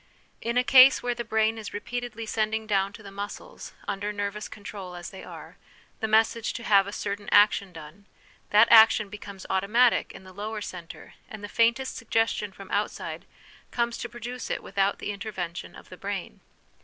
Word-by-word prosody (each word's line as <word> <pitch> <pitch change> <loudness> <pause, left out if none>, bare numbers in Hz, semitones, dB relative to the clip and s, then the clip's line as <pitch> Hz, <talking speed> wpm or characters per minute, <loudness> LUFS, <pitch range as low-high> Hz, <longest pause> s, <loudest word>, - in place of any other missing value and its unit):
In 235 +1 -1
a 250 - +4
case 260 +1 +7
where 245 0 0
the 235 - -4
brain 220 0 +1
is 210 -2 -7
repeatedly 235 +1 -5
sending 220 0 -1
down 195 -2 +1
to 220 - -12
the 200 - -10
muscles, 205 - -8
under 205 +1 -2
nervous 205 0 -4
control 195 -3 -8
as 175 0 -8
they 190 - -10
are, - - -11 0.4
the 220 - -1
message 220 +1 +2
to 235 - -6
have 200 -3 +4
a - - -5
certain 205 0 -4
action 205 -2 +5
done, 165 +5 -12 0.4
that 215 +2 +6
action 220 -2 +7
becomes 200 -1 -9
automatic 215 +6 +3
in - - -12
the 185 0 -13
lower 210 +3 -5
centre, 180 -4 -9 0.2
and 215 -1 -9
the - - -4
faintest 235 +4 +1
suggestion 225 -2 0
from 195 0 -12
outside 205 +1 -3 0.4
comes 235 -1 -1
to 240 - -5
produce 240 +1 -7
it - - -3
without 195 0 0
the - - -4
intervention 180 - -6
of - - -14
the - - -11
brain. - - -5
210 Hz, 180 wpm, -27 LUFS, 200-230 Hz, 0.4 s, case